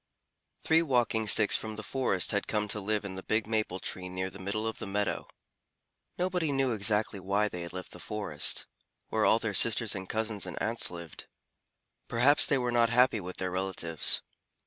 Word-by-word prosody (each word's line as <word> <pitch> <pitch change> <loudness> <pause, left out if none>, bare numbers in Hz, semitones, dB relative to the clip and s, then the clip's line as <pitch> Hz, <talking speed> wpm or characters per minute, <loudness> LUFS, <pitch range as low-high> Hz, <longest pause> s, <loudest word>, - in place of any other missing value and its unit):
Three 160 +1 +4
Walking 120 -7 0
Sticks 105 0 +5
from 110 -1 -3
the 110 - -7
forest 100 -5 0
had 100 - -1
come 105 -1 -1
to 105 - -1
live 105 +1 -2
in 95 - -6
the 95 - -7
big 110 +3 -1
maple 110 -4 -2
tree 90 -1 -3
near 95 +1 -4
the 100 - -12
middle 100 +3 -3
of 110 - -4
the - - -6
meadow. 100 0 -2 0.9
Nobody 180 -4 -1
knew 135 -2 +1
exactly 105 -1 0
why 100 +3 0
they 90 -4 -6
had 85 - -6
left 90 0 -8
the 90 - -11
forest, 105 +2 -2 0.4
where - - +1
all - - +5
their - - -3
sisters - - +3
and 95 0 -7
cousins 110 -3 -3
and 90 - -6
aunts 115 +2 +3
lived. 85 -2 -9 0.8
Perhaps 130 +9 +4
they 145 -5 +2
were 125 -1 -1
not 120 -1 +3
happy 125 -1 +3
with 90 -1 -8
their 95 -1 -3
relatives. 90 -4 +4
105 Hz, 190 wpm, -29 LUFS, 95-115 Hz, 0.9 s, Sticks